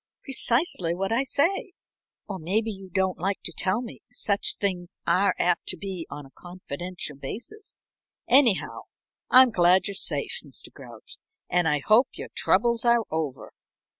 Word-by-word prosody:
"Precisely 240 - 0
what 195 +3 -2
I 235 +4 +2
say 350 - 0 0.5
or 195 -2 -5
maybe 210 +7 -1
you 195 -2 -10
don't 190 0 0
like 195 +3 -1
to 175 - -4
tell 190 +6 0
me 235 - -10
such 200 -1 +1
things 180 -3 -3
are 195 +1 +3
apt 175 -1 +1
to 185 - +4
be 185 -2 -6
on 145 0 -8
a 135 - -17
confidential 175 -2 -7
basis. 240 - -7 0.4
Anyhow, 250 -5 +3 0.4
I'm 255 -1 +7
glad 180 -1 +4
you're 200 - -4
safe, 195 - -1
Mr. - - -8
Grouch, - - -12 0.3
and 175 -2 +3
I 150 -2 +1
hope 220 +5 +5
your - - -7
troubles 235 -1 +2
are 235 -1 +4
over." 155 -4 -4
195 Hz, 155 wpm, -26 LUFS, 175-235 Hz, 0.5 s, I'm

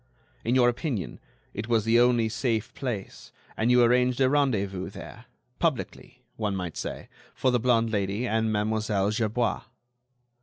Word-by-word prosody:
In 120 +3 +1
your 125 -2 +5
opinion, 120 - -2 0.3
it 105 +2 -5
was 115 -3 +1
the 115 +1 +4
only 120 -2 +4
safe 115 +1 -2
place, 120 -8 -6 0.2
and 110 +2 0
you 125 0 +6
arranged 125 +1 +3
a 130 -1 +3
rendezvous 100 -10 0
there, - - -11 0.3
publicly, - - -3
one 105 -3 -1
might 90 -4 -4
say, - - -5 0.3
for 130 - +1
the 125 - +2
blonde 115 -1 +2
Lady 100 +3 -1
and 110 0 0
Mademoiselle 105 -1 0
Gerbois." 115 +2 0
115 Hz, 150 wpm, -27 LUFS, 105-125 Hz, 0.3 s, you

